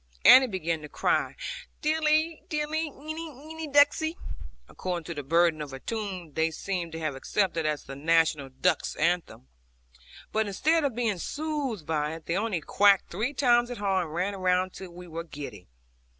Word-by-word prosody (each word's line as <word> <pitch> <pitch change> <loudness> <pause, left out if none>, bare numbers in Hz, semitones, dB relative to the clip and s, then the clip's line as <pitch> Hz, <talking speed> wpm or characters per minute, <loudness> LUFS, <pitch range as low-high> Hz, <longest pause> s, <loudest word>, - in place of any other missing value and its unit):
Annie 260 0 +10
began 170 -6 -2
to 150 - -9
cry - - 0 0.5
'Dilly, 310 +1 +2
dilly, 305 0 -1
einy, 315 +3 -7
einy, 310 +3 -8
ducksey,' 290 +3 +4 0.5
according 180 -2 -4
to 170 - -5
the 145 - -4
burden 165 +2 +2
of 145 -2 -6
a 135 - -6
tune 190 -6 -5
they 160 +2 +2
seem 175 +1 -3
to 160 - -7
have 155 -3 -2
accepted 165 +2 0
as 150 -2 -1
the 135 - -8
national 155 -1 +2
duck's 130 0 0
anthem; 170 - -1 0.8
but 220 0 +1
instead 315 - +2
of 275 -5 0
being 225 -6 0
soothed 285 - -3
by 150 0 -1
it, 165 - -11
they 170 - -1
only 200 -4 -1
quacked 200 +2 +4
three 225 +10 -2
times 240 -3 +4
as 245 - -5
hard, 195 -3 +1
and 155 - -8
ran 190 +3 -1
round 185 0 +1
till 190 -1 -8
we 175 +1 -11
were 165 0 -5
giddy. 140 - -9
185 Hz, 175 wpm, -28 LUFS, 160-270 Hz, 0.8 s, Annie